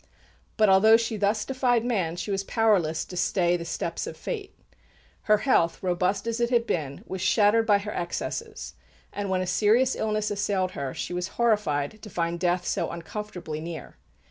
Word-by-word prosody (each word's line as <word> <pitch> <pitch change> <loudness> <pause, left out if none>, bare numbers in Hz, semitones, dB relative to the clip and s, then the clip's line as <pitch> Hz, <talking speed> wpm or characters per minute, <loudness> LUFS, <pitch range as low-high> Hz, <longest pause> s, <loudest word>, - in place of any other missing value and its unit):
But, 215 -1 +5
although 210 +4 +7
she 230 -1 -2
thus 210 +1 0
defied 250 -3 +1
man, 190 -9 0
she 175 +4 -4
was 195 0 -1
powerless 195 -8 +1
to 180 - -9
stay 175 -1 +2
the 170 -1 -4
steps 170 - -3
of - - -7
fate. 415 -5 -6 0.7
Her 215 - +7
health, 205 -9 +1
robust 180 +3 0
as 230 0 -2
it 235 0 +1
had 235 -2 +2
been, 145 -9 -3
was 190 -1 -5
shattered 215 +3 +3
by 205 -2 +5
her 205 +1 -5
excesses; 175 0 -4 0.4
and 200 -1 -3
when 185 -1 +1
a - - -1
serious 220 +8 +3
illness 215 -1 -1
assailed 200 -2 0
her, 135 -5 -5
she - - -4
was 180 0 -2
horrified 210 -7 +1
to 215 - -9
find 170 -2 -2
death 175 0 0
so - - -1
uncomfortably 170 -3 -6
near. 165 0 -8
200 Hz, 180 wpm, -26 LUFS, 175-220 Hz, 0.7 s, although